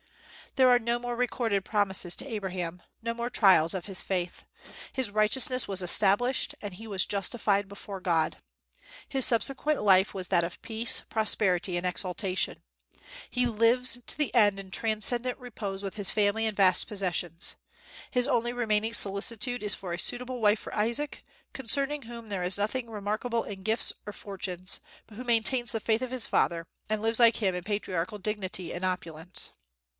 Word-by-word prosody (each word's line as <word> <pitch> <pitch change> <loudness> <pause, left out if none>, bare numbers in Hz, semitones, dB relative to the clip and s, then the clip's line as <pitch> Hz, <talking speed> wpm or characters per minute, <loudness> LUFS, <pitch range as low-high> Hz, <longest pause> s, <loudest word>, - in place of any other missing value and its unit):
There 260 -1 +5
are 245 -1 +6
no 235 0 0
more 245 0 -4
recorded 235 -4 0
promises 195 -4 0
to - - -3
Abraham, 185 -6 -4 0.2
no 230 0 -1
more 235 +1 -3
trials 185 -9 +5
of 185 - -4
his 195 -2 -3
faith. 180 -2 -3 0.5
His 260 -6 -1
righteousness 240 +4 +3
was 195 -1 -1
established, 205 +8 +2
and 205 -3 -6
he 220 +5 -10
was 195 -3 +1
justified 200 0 -1
before 200 -1 -8
God. 165 -3 +1 0.7
His 265 -2 +2
subsequent 275 +4 +2
life 190 -1 +4
was 185 -2 -4
that 170 - +2
of 170 +1 -6
peace, 225 +1 +2
prosperity, 190 -4 +2
and 175 - -3
exaltation. 185 +1 -1 0.7
He 250 0 0
lives 240 +2 +3
to - - -2
the 300 -2 -1
end 205 -4 +4
in 190 -1 -9
transcendent 235 +4 0
repose 210 -6 -6
with 195 -2 -4
his 205 -3 +2
family 210 +1 +1
and 215 - -4
vast 185 -2 +4
possessions. 180 -5 -2 0.5
His 250 +1 +2
only 240 -3 +1
remaining 225 -2 0
solicitude 220 +5 +1
is 210 - +3
for 180 -3 -6
a 170 - -3
suitable 250 +4 -2
wife 210 0 +4
for - - -9
Isaac, 235 +8 -1 0.3
concerning 275 +3 +2
whom 235 -2 -10
there 195 -3 -3
is 180 +2 0
nothing 230 +4 -2
remarkable 220 +3 -2
in 195 -2 -8
gifts 220 +3 +3
or - - -3
fortunes, 185 -2 -3 0.3
but 215 - -15
who 250 - -7
maintains 240 +1 +1
the 225 - -1
faith 220 +2 0
of 255 -1 -4
his 255 -3 0
father, 165 -1 0 0.2
and 215 -1 -1
lives 225 +1 +2
like 230 -1 +6
him 195 -4 0
in 180 - -4
patriarchal 200 -1 -3
dignity 190 -3 -3
and 175 - -5
opulence. 180 -2 -3
210 Hz, 170 wpm, -28 LUFS, 190-235 Hz, 0.7 s, are